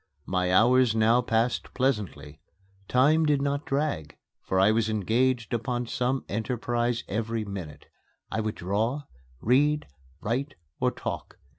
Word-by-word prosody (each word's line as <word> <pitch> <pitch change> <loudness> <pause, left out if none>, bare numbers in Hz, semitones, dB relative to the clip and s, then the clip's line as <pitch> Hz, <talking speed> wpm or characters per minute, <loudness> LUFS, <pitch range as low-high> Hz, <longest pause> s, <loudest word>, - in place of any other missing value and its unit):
My 90 -1 0
hours 120 +3 +5
now 115 +2 +4
passed 115 0 0
pleasantly. 95 - -2 0.5
Time 150 +6 +4
did 150 -2 +3
not 140 +1 -1
drag, 135 - -2 0.2
for 95 - 0
I 95 +3 +5
was 110 0 +1
engaged 115 +4 +1
upon 120 +1 -1
some 125 +2 -1
enterprise 120 +2 -1
every 115 +1 -2
minute. 90 -7 -7 0.5
I 110 - 0
would 110 0 -2
draw, 110 +10 -1 0.4
read, 145 +5 +3 0.3
write, 135 +6 -2 0.2
or - - +3
talk. - - -6
115 Hz, 130 wpm, -27 LUFS, 105-130 Hz, 0.5 s, hours